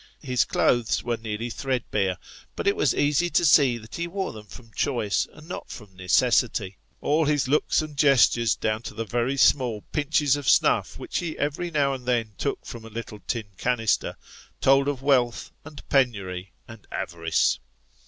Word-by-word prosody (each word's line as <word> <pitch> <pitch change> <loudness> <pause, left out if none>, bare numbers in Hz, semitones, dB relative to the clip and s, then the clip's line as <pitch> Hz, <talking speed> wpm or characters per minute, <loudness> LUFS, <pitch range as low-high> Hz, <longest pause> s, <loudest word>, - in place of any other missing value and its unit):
His 125 -3 +1
clothes 120 -2 +1
were 120 -1 -1
nearly 110 +1 -4
threadbare, 110 -8 -1 0.4
but - - -4
it 200 - +3
was 145 - +1
easy 150 +4 +2
to 175 - +2
see 140 -5 +5
that 110 -1 -13
he 170 0 -2
wore 190 +2 -3
them 105 -1 -11
from 115 +2 -13
choice 120 -7 0
and 155 +1 -15
not 180 - -7
from 105 -5 -11
necessity; 95 +1 +1 0.2
all 155 +2 +2
his 145 -2 +1
looks 150 +2 +2
and 155 -1 -8
gestures 125 -5 +4
down 110 0 -1
to 115 - -8
the 115 +1 -3
very 120 +5 -1
small 125 -5 +3
pinches 145 -2 +2
of 145 -3 -1
snuff - - +3
which - - -3
ho 170 -3 -3
every 150 +4 -2
now 145 -4 +1
and 125 -2 -8
then 115 -3 0
took - - -3
from 115 - -8
a 115 - -10
little 110 -1 -7
tin 110 -4 -3
canister, 115 -4 0 0.4
told 135 +1 +4
of 140 -2 -2
wealth, 125 -4 +1
and 150 -1 -12
penury, 100 -9 0 0.2
and 110 -3 -13
avarice. 85 -3 0
125 Hz, 175 wpm, -25 LUFS, 110-145 Hz, 0.4 s, see